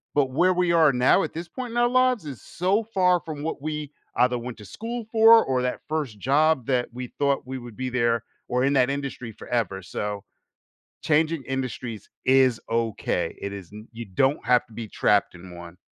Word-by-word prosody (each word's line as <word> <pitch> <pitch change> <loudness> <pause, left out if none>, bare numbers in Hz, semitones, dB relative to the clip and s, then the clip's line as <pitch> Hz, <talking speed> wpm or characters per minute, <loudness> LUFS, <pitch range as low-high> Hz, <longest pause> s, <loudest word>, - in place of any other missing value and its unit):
but 135 -3 +2
where 180 +7 +3
we 180 -1 +1
are 160 -3 +5
now, 125 +10 +4
at - - -4
this 170 +2 -6
point 250 +2 -6
in 235 - -4
our 240 0 +4
lives, 255 -5 +2
is 135 -7 -7
so 190 +5 0
far 185 -5 +2
from 150 -3 -6
what 160 - -4
we 150 -1 -4 0.2
either 125 0 +3
went 120 0 -7
to 105 - -11
school 230 - -6
for, 225 0 +7
or 130 -1 0
that 125 0 -2
first 145 -9 -3
job 140 +3 +2
that 125 -2 +1
we 125 0 -5
thought 140 -2 +1
we 130 0 -4
would 120 -3 -10
be 130 0 -2
there, 120 -2 +1 0.2
or 125 +1 0
in 135 - +3
that 130 -2 +3
industry 140 -4 -4
forever, 100 -5 -2
so 100 +2 -4 0.8
changing 155 -1 +1
industries 125 -5 -5 0.2
is 130 -2 +4
okay. 115 -1 -1
It 100 - -5
is 95 -3 -9
n 105 +2 -10
you 115 0 -7
don't 130 +9 +1
have 125 0 +3
to 115 - -18
be 115 0 -6
trapped 100 -2 +2
in 90 0 -11
one. 85 0 -11
130 Hz, 205 wpm, -25 LUFS, 115-160 Hz, 0.8 s, for